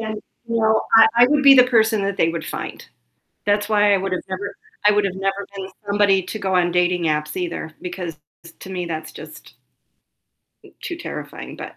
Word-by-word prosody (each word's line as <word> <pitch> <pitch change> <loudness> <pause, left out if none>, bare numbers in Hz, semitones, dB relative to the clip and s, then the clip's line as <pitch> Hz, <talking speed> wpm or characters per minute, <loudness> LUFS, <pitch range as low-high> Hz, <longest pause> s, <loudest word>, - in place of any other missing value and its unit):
And, 220 -1 -4 0.3
you 230 - -1
know, 220 -1 +2
I 225 - +9
I 245 - +8
would 295 -1 +2
be 275 -1 +9
the 255 -2 +7
person 220 -3 +2
that 200 0 -2
they 165 -3 +2
would 165 -2 -5
find. - - -6 0.6
That's 205 0 +1
why 210 -1 +3
I - - +4
would've 185 -1 -3
never 200 +2 -5 0.3
I 210 - +7
would've 200 -2 0
never 195 +1 -2
been 190 0 -6 0.2
somebody 200 -1 +3
to 185 +5 -6
go 190 -2 -1
on 175 -1 +2
dating 180 0 +1
apps 150 -1 -1
either 170 -3 -4
because 175 -3 -6 0.4
to 190 - -10
me 180 -2 -4
that's 160 -2 -5
just - - -12 1.1
m - - -18
too 345 - -5
terrifying, - - -8
but, - - -9
195 Hz, 195 wpm, -21 LUFS, 180-215 Hz, 1.1 s, I